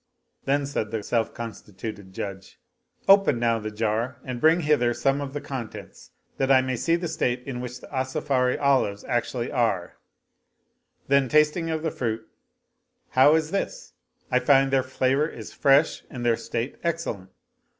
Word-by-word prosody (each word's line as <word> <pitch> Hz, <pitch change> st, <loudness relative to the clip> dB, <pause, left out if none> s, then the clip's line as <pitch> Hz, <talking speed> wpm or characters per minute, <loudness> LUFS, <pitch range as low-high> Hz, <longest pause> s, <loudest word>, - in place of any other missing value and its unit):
Then 140 Hz, +1 st, +1 dB
said 135 Hz, -6 st, -2 dB
the 110 Hz, -1 st, -3 dB
self 115 Hz, 0 st, 0 dB
constituted 105 Hz, -3 st, -8 dB
Judge, 95 Hz, 0 st, -7 dB, 0.2 s
" -, -, -39 dB
Open 195 Hz, -8 st, +6 dB
now 115 Hz, -1 st, +1 dB
the 110 Hz, 0 st, -4 dB
jar 110 Hz, +3 st, -2 dB
and 125 Hz, -2 st, -5 dB
bring 165 Hz, +3 st, +5 dB
hither 140 Hz, -6 st, +2 dB
some 135 Hz, +1 st, +1 dB
of 140 Hz, -1 st, -5 dB
the 145 Hz, -, -3 dB
contents 135 Hz, -6 st, -8 dB, 0.3 s
that 135 Hz, 0 st, +1 dB
I 130 Hz, -, +7 dB
may 130 Hz, 0 st, -1 dB
see 165 Hz, +8 st, +1 dB
the 175 Hz, 0 st, -2 dB
state 125 Hz, -6 st, -1 dB
in 125 Hz, -2 st, -5 dB
which 125 Hz, 0 st, -7 dB
the -, -, -11 dB
Asafiri 130 Hz, -1 st, 0 dB
olives 130 Hz, -8 st, +2 dB
actually 120 Hz, -1 st, -2 dB
are." 115 Hz, -9 st, 0 dB, 1.1 s
Then 140 Hz, -2 st, +3 dB
tasting 155 Hz, +3 st, +3 dB
of 160 Hz, -1 st, -2 dB
the 160 Hz, -, 0 dB
fruit, 110 Hz, -2 st, -3 dB, 0.4 s
" -, -, -49 dB
How 140 Hz, +4 st, +6 dB
is 160 Hz, 0 st, 0 dB
this? -, -, -3 dB, 0.4 s
I 125 Hz, -, +4 dB
find'their 135 Hz, 0 st, +4 dB
flavor 130 Hz, +3 st, +1 dB
is -, -, -9 dB
fresh 140 Hz, +3 st, +3 dB
and 125 Hz, -5 st, -6 dB
their 120 Hz, -1 st, +4 dB
state 120 Hz, +3 st, -4 dB
excellent. 165 Hz, -, -3 dB
130 Hz, 165 wpm, -25 LUFS, 115-145 Hz, 1.1 s, I